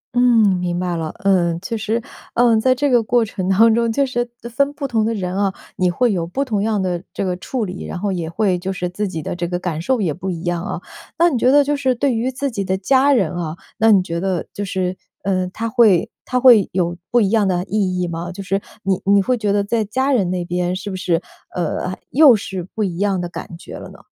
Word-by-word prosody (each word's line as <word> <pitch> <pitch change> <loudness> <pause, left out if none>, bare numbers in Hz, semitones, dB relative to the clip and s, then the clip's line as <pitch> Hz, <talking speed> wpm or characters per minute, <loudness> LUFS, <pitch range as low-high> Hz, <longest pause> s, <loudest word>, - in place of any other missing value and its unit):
嗯， 225 -6 +4
明 175 0 -2
白 180 -1 -1
了。 160 -1 -3
呃， 175 -4 +2
其 195 +5 -4
实， 220 +2 -1 0.4
嗯， 235 -2 +4
在 255 +1 +3
这 285 +3 0
个 240 -2 +5
过 235 +1 +2
程 190 -2 -4
当 220 +4 +5
中， 230 0 +1
就 275 +4 +2
是 240 -2 -2 0.3
分 280 +1 +2
不 285 -1 -4
同 225 -4 +1
的 225 - 0
人 185 -2 -3
啊， 200 -1 +1 0.2
你 180 -1 +1
会 240 +6 +1
有 170 -2 -1
不 275 +10 -2
同 210 -5 -1
样 215 -1 0
的 175 -1 -2
这 195 - -1
个 180 -1 -1
处 230 +4 -3
理， 185 0 -6
然 - - -5
后 200 +2 -1
也 170 -3 -3
会 185 -1 0
就 190 +2 -3
是 180 -1 -3
自 205 +3 -3
己 165 -4 -5
的 - - -4
这 175 -1 -2
个 175 0 -2
感 170 -3 -3
受 250 +6 0
也 165 -6 0
不 190 +4 -5
一 170 0 -4
样 175 0 -1
啊。 - - -4 0.4
那 340 +1 +5
你 255 - 0
觉 255 - +4
得 290 0 +6
就 290 +1 0
是 260 -3 +1
对 270 +1 +1
于 235 +3 0
自 270 +1 -3
己 200 -3 -2
的 190 0 -1
家 265 +8 +3
人 200 - +2
啊， 165 -2 -3 0.2
那 225 0 +5
你 190 -3 +5
觉 170 -1 -3
得 185 -2 -1
就 205 - -4
是， 185 -1 -2 0.3
呃， 185 -2 0
它 230 +3 -3
会 220 -5 +4 0.2
它 250 0 0
会 240 -6 +6
有 175 -2 0
不 240 - +3
一 200 -2 +2
样 215 -3 +3
的 180 -1 0
意 190 -3 -1
义 180 - 0
吗？ 170 +1 -5
就 195 +2 -7
是 195 +1 -1 0.2
你 190 -1 0
你 200 - +6
会 250 +6 +1
觉 210 -3 -1
得 200 0 +2
在 220 +2 0
家 260 +7 0
人 200 -9 +2
那 180 -1 -2
边， 180 +1 -1
是 200 +1 -5
不 - - -4
是， 175 -2 0 0.4
呃， 180 +2 -2
又 280 -4 +7
是 195 -3 -4
不 215 - 0
一 175 -3 -2
样 200 -2 +1
的 175 - -3
感 170 -1 -8
觉 - - -10
了 - - -9
呢？ - - -14
195 Hz, 275 characters per minute, -19 LUFS, 180-235 Hz, 0.4 s, 又